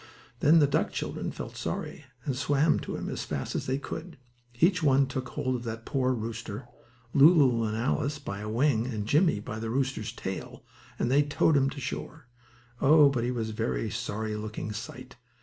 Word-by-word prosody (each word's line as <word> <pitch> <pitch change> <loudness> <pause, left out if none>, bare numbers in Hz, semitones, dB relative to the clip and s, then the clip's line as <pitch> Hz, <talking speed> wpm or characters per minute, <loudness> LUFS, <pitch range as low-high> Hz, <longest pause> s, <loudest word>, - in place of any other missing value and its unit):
Then 155 +3 +6
the 155 - +6
duck 140 - +1
children - - -3
felt - - -7
sorry, - - -4 0.2
and 135 - -1
swam 145 +3 +2
to - - -5
him - - -4
as - - -3
fast - - -4
as - - -3
they 130 +1 +1
could. 165 +4 -7 0.4
Each 180 +3 +4
one 140 -2 +4
took 130 -1 -4
hold 130 -3 -1
of 120 - -4
that 115 0 -5
poor 130 -3 +1
rooster; 115 0 -4 0.5
Lulu 140 -6 +6
and 110 0 -2
Alice 140 +5 0
by 100 -9 -6
a 105 +1 -5
wing, 120 0 +2
and 110 -5 -3
Jimmie 150 - +3
by 110 +1 -6
the 115 0 -3
rooster's 130 -3 -1
tail, 95 -5 -6 0.3
and 120 - 0
they 140 +2 +5
towed 145 +1 +2
him 135 -1 +3
to 140 - -7
shore. 140 +3 -6 0.6
Oh, 145 +1 +7
but 125 -4 -1
he 120 - 0
was 115 -3 -2
a - - -1
sorry 110 +1 -3
looking 105 0 -5
sight! 125 +3 -8
130 Hz, 190 wpm, -28 LUFS, 110-145 Hz, 0.6 s, Oh